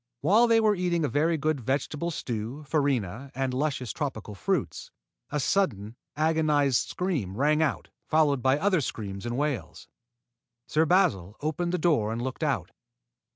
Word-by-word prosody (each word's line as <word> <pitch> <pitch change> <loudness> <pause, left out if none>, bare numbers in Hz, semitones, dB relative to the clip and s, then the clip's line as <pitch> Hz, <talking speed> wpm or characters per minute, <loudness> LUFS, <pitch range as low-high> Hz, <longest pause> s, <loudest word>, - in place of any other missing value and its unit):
While 210 +10 +5
they 230 -1 +5
were 215 -1 +4
eating 175 -4 0
a - - +1
very 155 +6 +1
good 155 -1 0
vegetable 145 +6 -1
stew, 120 -2 -4
farina, 135 - -1
and 135 -1 -1
luscious 130 -2 -1
tropical 110 -8 -4
fruits, 95 - -2 0.4
a 150 - -1
sudden, 120 - 0 0.2
agonized 150 -4 +2
scream 145 - -2
rang 150 +3 +3
out, 155 - -1 0.2
followed 150 -4 +3
by 130 +3 +3
other 185 0 +2
screams 100 -4 -5
and 120 +1 -2
wails. 140 - -3 0.8
Sir 155 +6 +2
Basil 140 - +2
opened 165 +3 -1
the 180 - 0
door 150 -11 +2
and 115 - -3
looked 130 +2 -4
out. - - -1
145 Hz, 155 wpm, -27 LUFS, 120-160 Hz, 0.8 s, While